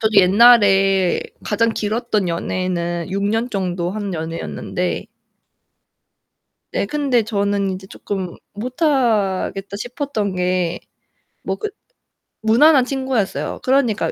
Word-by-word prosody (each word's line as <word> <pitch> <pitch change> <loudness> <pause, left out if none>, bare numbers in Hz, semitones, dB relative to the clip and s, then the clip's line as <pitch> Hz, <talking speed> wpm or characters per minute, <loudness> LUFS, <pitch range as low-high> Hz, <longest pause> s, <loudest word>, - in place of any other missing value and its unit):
저도 220 -1 0
옛날에 195 -2 +5 0.2
가장 230 +2 +1
길었던 215 -2 -1
연애는 175 0 -2
6 200 +1 -2
년 225 +4 0
정도 180 -4 -2
한 200 -2 -4
연애였는데 165 +2 -3 1.7
네 - - 0
근데 260 0 +1
저는 200 -2 0
이제 190 0 -6
쪼끔 190 -2 -5 0.2
'못 245 +9 -6
하겠다.' 205 - +1
싶었던게 195 - -2 0.6
뭐 - - -2
그 430 - -4 0.7
무난한 255 +6 +5
친구였어요. 260 -5 -2
그러니까 255 -5 +2
205 Hz, 225 characters per minute, -20 LUFS, 185-235 Hz, 1.7 s, 옛날에